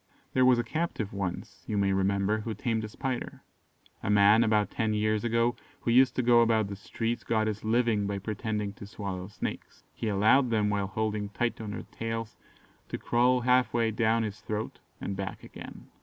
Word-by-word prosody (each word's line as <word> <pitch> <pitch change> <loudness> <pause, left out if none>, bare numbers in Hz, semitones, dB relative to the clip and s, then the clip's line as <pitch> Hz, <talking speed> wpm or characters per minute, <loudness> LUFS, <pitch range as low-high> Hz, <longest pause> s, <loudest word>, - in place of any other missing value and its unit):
There 130 0 +4
was 125 -1 +6
a 120 - +1
captive 115 - -3
once, 95 -3 -5
you 105 - -1
may 100 -1 +2
remember, 100 +2 +1
who 110 0 -4
tamed 110 0 -1
a - - -7
spider. 130 +2 -4 0.6
A - - -3
man, 105 +2 +6
about 110 -2 +2
ten 110 -2 0
years 110 0 +1
ago, 115 +1 +2 0.3
who 115 - 0
used 130 +2 +5
to 130 - +1
go 120 0 +6
about 110 -3 +2
the 100 - -5
streets, 115 +4 -3
got 110 -1 +1
his 110 -1 -3
living 110 -2 +2
by 100 0 -2
pretending 105 0 -3
to 100 - -10
swallow 100 -3 -5
snakes. 105 - -6
He 115 - -4
allowed 110 +6 +4
them, 105 -2 +1
while 100 -1 0
holding 105 0 -2
tight 115 +3 -2
on 110 - -5
their 105 - -5
tails, 115 -1 -4 0.5
to - - -3
crawl 125 +1 +2
half 125 -2 +3
way 115 -1 +2
down 110 +1 +2
his 105 -1 -5
throat 110 0 -4 0.2
and 100 - -4
back 95 -1 -5
again. - - -10
110 Hz, 195 wpm, -29 LUFS, 100-115 Hz, 0.6 s, was